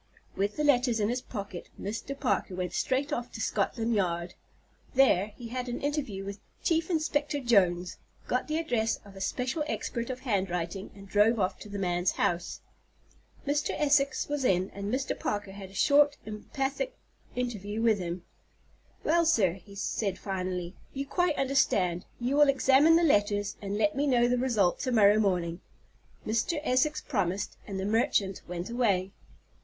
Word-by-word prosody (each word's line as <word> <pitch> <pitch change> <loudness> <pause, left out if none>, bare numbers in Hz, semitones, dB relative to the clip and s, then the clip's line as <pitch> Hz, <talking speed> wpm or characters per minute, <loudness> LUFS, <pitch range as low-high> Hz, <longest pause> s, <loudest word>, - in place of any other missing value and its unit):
With 200 +2 -1
the 300 - 0
letters 250 -5 +3
in 210 0 +1
his 250 +1 -1
pocket, 200 -7 -7
Mr. 225 +7 -5
Parker 245 -7 0
went 180 -1 -3
straight 265 +2 0
off 240 0 -3
to - - -7
Scotland 225 +2 0
Yard. 175 -4 0 0.6
There 230 -8 +5
he 235 -2 -8
had 250 +1 -3
an 240 - -3
interview 275 -10 -2
with 200 0 -6 0.2
Chief 330 0 +1
Inspector 300 -3 0
Jones, 180 -7 +2 0.3
got 250 - -1
the 310 0 -1
address 240 -9 0
of 200 -1 -14
a 195 - -9
special 255 - -1
expert 235 -5 -3
of 255 0 -5
handwriting, 190 -5 -2
and 200 0 -12
drove 210 +3 +3
off 185 -1 0
to 210 - -10
the 200 - -5
man's 175 -1 +1
house. 175 0 -1 0.8
Mr. 290 +1 0
Essex 280 -2 +2
was 290 -2 -2
in, 185 -5 +2
and 200 +1 -5
Mr. 265 +2 0
Parker 205 -1 -2
had 195 -1 -9
a 195 - -15
short, 290 +4 +4
emphatic 270 - -3 0.4
interview 220 -4 -3
with 225 -3 +3
him. 175 0 -4 0.8
"Well, 335 +2 +3
sir." 205 - +4
he 195 +3 -12
said 200 -1 -2
finally, 185 -2 -3 0.2
"you 275 +1 -2
quite 355 +2 +1
understand. 195 -10 +1
You 250 +4 0
will 295 -1 +6
examine 275 +4 +5
the 340 - +4
letters, 205 -7 +2
and 200 0 -3
let 210 -1 +2
me 285 +2 +1
know 240 -3 +4
the 245 0 +1
result 220 -8 +2
to 255 - -1
morrow 210 -2 +6
morning." 175 -4 0 0.6
Mr. 230 +9 0
Essex 300 +3 +2
promised, 200 -4 -1
and 195 -2 -4
the 190 - -2
merchant 205 -3 +1
went 175 +1 -4
away. 200 -6 +1
220 Hz, 170 wpm, -29 LUFS, 195-270 Hz, 0.8 s, will